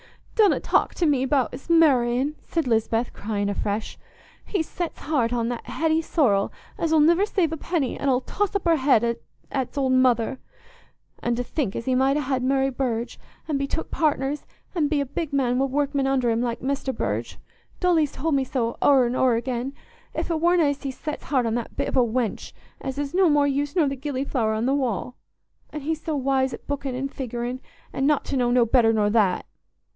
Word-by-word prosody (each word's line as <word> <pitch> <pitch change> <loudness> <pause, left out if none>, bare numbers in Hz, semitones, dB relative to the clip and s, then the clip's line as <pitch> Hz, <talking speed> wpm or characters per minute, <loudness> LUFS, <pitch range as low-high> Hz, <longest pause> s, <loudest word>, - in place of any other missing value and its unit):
"Donna 425 -4 +4
talk - - +1
to 350 - +1
me 285 -4 +3
about's 265 +2 -1
marr'in'," 275 -4 +3
said 330 -3 -1
Lisbeth, 225 0 0
crying 205 -1 -2
afresh. 205 +1 -3 0.4
"He's 350 -6 -2
set's 345 -2 -5
heart 270 -6 0
on 235 -1 0
that 240 -1 -5
Hetty 320 0 +1
Sorrel, 235 - +2 0.3
as 330 - 0
'ull 320 - +5
niver 340 +6 +4
save 355 -7 +1
a - - -3
penny, 310 -4 -1
an' 280 - 0
'ull 255 -1 +2
toss 410 +8 -2
up 400 - -1
her 335 -1 +4
head 235 -4 +3 0.3
at's 265 +1 -3
old 265 -2 +1
mother. 255 -1 +2 0.8
An' 240 0 0
to 245 - -2
think 245 -6 -2
as 230 - -4
he 260 - +1
might 265 +2 +3
ha' 270 -3 0
Mary 270 +1 +1
Burge, 245 -3 -3 0.3
an' 295 -3 0
be 275 - -1
took 325 - -4
partners, 295 -2 0 0.3
an' 320 -5 +1
be 295 0 +1
a 280 - 0
big 300 +3 -4
man 255 -3 +1
wi' 270 - +3
workmen 280 0 0
under 260 -3 +2
him, 225 +1 0
like 240 -1 -2
Mester 275 0 -1
Burge—Dolly's 320 +5 -2
told 320 +2 -1
me 275 -1 +2
so 240 -3 -2
o'er 270 -3 +5
and 240 +1 -1
o'er 255 -2 +3
again—if 260 - -5
it 320 -1 -1
warna 345 0 +4
as 285 -1 0
he's 270 -2 -5
set's 300 -1 -5
heart 260 -4 +1
on 225 - 0
that 235 -1 -4
bit - - 0
of - - -3
a - - +5
wench, 235 -1 -2 0.3
as 270 0 -5
is 285 -1 -3
o' - - 0
no 370 -3 +5
more 290 -1 +4
use 285 +2 -1
nor 325 -5 +3
the 275 - -2
gillyflower 260 -5 -1
on 225 - -1
the 265 - +2
wall. 250 -3 -1 0.5
An' 300 - -6
he 310 +4 -1
so 315 0 -4
wise 265 -2 +1
at - - -17
bookin' 280 -2 -3
an' 270 +2 -2
figurin', 245 -1 -4 0.3
an' 270 - 0
not 300 -1 +2
to - - -3
know 245 -2 +2
no 245 -1 +4
better 230 -1 +4
nor 210 -2 +2
that!" 205 -5 +2
270 Hz, 210 wpm, -24 LUFS, 245-295 Hz, 0.8 s, ull